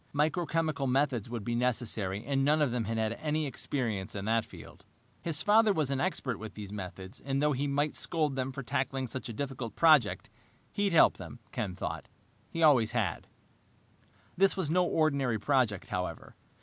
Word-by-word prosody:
Microchemical 155 -2 0
methods 130 -4 +1
would 115 -3 -4
be 120 - -2
necessary, 115 -4 -1
and 135 0 +1
none 150 +3 +3
of 145 -5 +2
them 120 -2 -1
had 115 +2 -2
had 110 0 0
any 155 0 0
experience 115 -9 -3
in 100 -1 -4
that 115 +1 +1
field. - - -13 0.4
His 155 -2 -2
father 215 +1 +5
was 150 -6 0
an 135 -1 0
expert 135 - -1
with 110 0 -8
these 105 -1 -7
methods 95 -1 -7
and 135 0 -1
though 150 +1 +3
he 140 +1 -1
might 145 +2 0
scold 155 -5 -1
them 130 0 -2
for 140 +1 -6
tackling 135 0 -1
such 130 0 -6
a - - -5
difficult 125 -3 -5
project, 135 - +4 0.4
he'd 200 -2 0
help 165 - +6
them, - - -9
Ken 90 -2 -3
thought. - - -5 0.4
He 165 - -2
always 130 -8 +5
had. - - -1 1.1
This 195 +2 +3
was 165 -5 -1
no 180 +1 +3
ordinary 140 -8 +1
project, 120 -5 +1
however. 90 -2 -4
135 Hz, 180 wpm, -30 LUFS, 115-150 Hz, 1.1 s, help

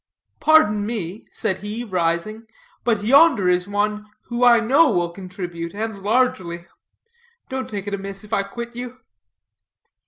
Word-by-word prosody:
"Pardon 215 -10 +4
me," 205 -3 -5
said 190 -5 -2
he, 210 +4 -5
rising, 185 +3 -2 0.4
"but 220 -4 +1
yonder 265 - +5
is 180 0 +2
one 210 +1 -1 0.2
who 240 0 -1
I 240 -1 +7
know 275 +8 +4
will 175 -5 0
contribute, 180 -2 -7
and 215 -1 -4
largely. 200 -6 0 0.8
Don't 260 0 -4
take 205 -2 -5
it 205 - -4
amiss 195 0 -5
if 210 +1 -10
I 200 - +3
quit 235 +4 -7
you." 250 +1 -7
210 Hz, 145 wpm, -22 LUFS, 190-235 Hz, 0.8 s, I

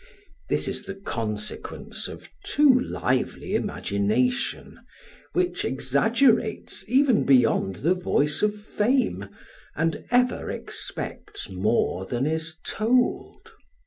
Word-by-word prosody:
This - - +1
is - - -2
the 195 - -6
consequence 110 - -4
of - - -11
too 290 -2 +5
lively 130 - -1
imagination, 105 - -1 0.5
which 365 0 0
exaggerates 230 -5 +1
even 255 -1 +4
beyond 125 -7 +3
the 175 - +5
voice 150 -5 0
of 210 0 +1
fame, 210 - 0 0.5
and 165 +1 -1
ever 250 +1 +2
expects - - -6
more 95 -1 0
than 120 +5 -1
is 160 +1 -1
told. 245 +3 0
180 Hz, 100 wpm, -25 LUFS, -, 0.5 s, too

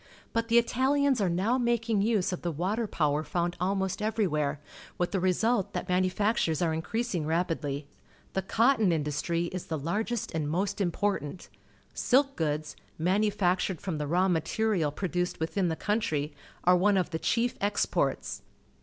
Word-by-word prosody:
But 230 0 0
the 235 +1 +6
ItaUans 265 +2 +2
are 190 - +2
now 200 +9 +1
making 230 -3 +1
use 210 -3 +1
of 180 - -4
the 175 - -1
water 195 +9 -1
power 150 -4 0
found 175 +1 -1
almost 190 +1 0
eA'erjT\'here, 175 -10 0 0.4
with 175 - 0
the 195 - 0
result 195 +4 +1
that - - -3
manufactures 185 -2 +1
are 165 -2 +1
increasing 175 0 -2
rapidly. 160 -4 -1 0.5
The 190 - 0
cotton 225 +2 +3
industrj' 165 +2 -1
is 185 - -5
the 160 - -2
largest 205 - -2
and 155 -2 -2
most 195 +5 -1
important. 180 -3 -1 0.4
Silk 275 +2 +2
goods, 155 -1 -2 0.2
manu 190 +6 +2
factured 185 -3 0
from 170 -6 -3
the 150 - -2
raw 180 +5 +2
material 175 0 +1
produced 180 +2 -2
witliin 175 +3 0
the 160 - -1
country, 160 -8 -1 0.3
are 180 +1 +6
one 195 +2 +3
of 180 -1 0
the 160 - -2
cliief 240 +6 +1
exports. 205 +1 0
185 Hz, 155 wpm, -29 LUFS, 165-215 Hz, 0.5 s, the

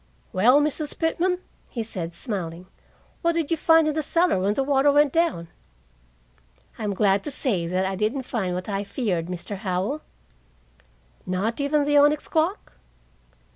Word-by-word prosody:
"Well, 240 +9 +5
Mrs. 300 0 -2
Pitman," 350 +2 +1 0.3
he 230 - -3
said, 175 -6 -5
smiling, 180 -5 -5 0.6
"what 335 0 +2
did 330 -2 -2
you - - +4
find 325 0 +4
in 305 - +1
the 310 - 0
cellar 335 - +2
when 200 +3 +1
the 275 - +1
water 280 +1 +3
went 290 -1 +3
down?" 325 - 0 1.3
"I'm 205 -2 -2
glad 195 0 +2
to - - -2
say 210 - -1
that 185 +2 0
I 190 0 -2
didn't 220 +7 -1
find 190 -8 -2
what 180 - -5
I 200 -1 -2
feared, 195 -6 -2
Mr. 180 +3 -6
Howell." 195 +9 -2 1.3
"Not 200 +8 -1
even 290 +1 +2
the 290 0 +3
onyx 295 +1 +4
clock?" 330 +6 -1
240 Hz, 160 wpm, -24 LUFS, 190-300 Hz, 1.3 s, Well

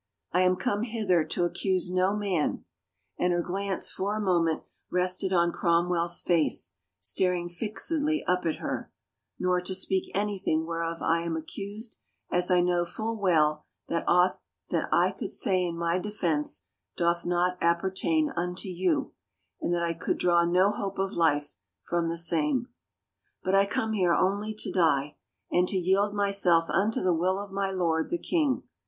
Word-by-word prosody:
I 180 - +3
am 185 0 +4
come 205 +1 -1
hither 215 -8 +1
to 175 +3 -1
accuse 185 0 -1
no 185 +2 +2
man," 195 -7 -1 0.5
and 180 - +2
her 175 0 0
glance 195 +2 -2
for 200 +2 -2
a - - -2
moment 170 -5 +1 0.3
rested 185 +1 +1
on 170 -2 +3
Cromwell's 170 0 +1
face, 155 - +1 0.3
staring 175 - 0
fixedly 290 - -2
up 180 0 0
at 160 - 0
her, - - -5 0.5
nor 180 0 +1
to 185 +1 -2
speak 190 0 0
anything 195 -6 0
whereof 165 0 -3
I 165 +1 +2
am 170 -1 -2
accused 205 +7 -6 0.3
as 180 0 +1
I 180 -1 +4
know 175 0 +2
full 220 +6 -4
well 155 -7 +2 0.3
that 170 - 0
aught 180 +1 +3 0.3
that - - 0
I - - +4
could - - -6
say 185 -2 +1
in 170 -1 -3
my 170 +1 0
defense 175 -7 -1 0.3
doth 170 0 +1
not 180 +1 0
appertain 190 - +1
unto 180 -2 -2
you 180 -2 0 0.5
and - - -1
that 175 -1 +1
I 170 0 0
could 165 - -2
draw 175 -1 +3
no 180 +4 +3
hope 200 -1 -4
of 195 0 -1
life 145 -5 +1 0.3
from 170 -1 0
the 170 - -3
same.... 170 - 0 0.7
But 185 - 0
I 195 0 +5
come 220 +2 -1
here 180 -5 +3
only 205 +3 0
to 215 - -2
die... 150 -5 +1 0.3
and 180 +1 +3
to 195 - +1
yield 195 +3 +2
myself 195 -5 +2
unto 210 +3 +1
the 185 -1 +3
will 180 +3 +1
of 200 0 -6
my 195 0 -1
lord, 170 -4 0
the 345 - 0
king. 305 -6 0
180 Hz, 170 wpm, -28 LUFS, 170-200 Hz, 0.7 s, I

